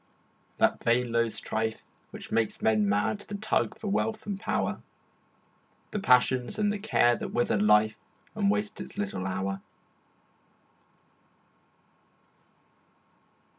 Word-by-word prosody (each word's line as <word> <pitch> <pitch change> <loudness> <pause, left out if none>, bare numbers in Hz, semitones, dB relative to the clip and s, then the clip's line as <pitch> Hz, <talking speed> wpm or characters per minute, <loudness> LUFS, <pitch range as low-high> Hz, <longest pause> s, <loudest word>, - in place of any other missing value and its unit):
That - - +2
vain 120 +1 +2
low 115 0 +2
strife 110 +1 -3 0.3
Which - - -10
makes 115 -2 0
men 110 -2 +3
mad, 105 +1 +1
the 205 - -7
tug 215 +2 0
for 215 - -6
wealth 215 +2 -1
and 200 -2 -4
power, 225 - -1 1.1
The 210 - -2
passions 125 -6 +3
and 210 -1 +1
the 210 - -4
cares 120 - +3
that - - -5
wither 120 -3 +1
life 105 +1 +4 0.4
And 205 -2 +1
waste 210 +1 -1
its - - -9
little 200 - -3
hour? 95 +1 -3
120 Hz, 120 wpm, -28 LUFS, -, 1.1 s, life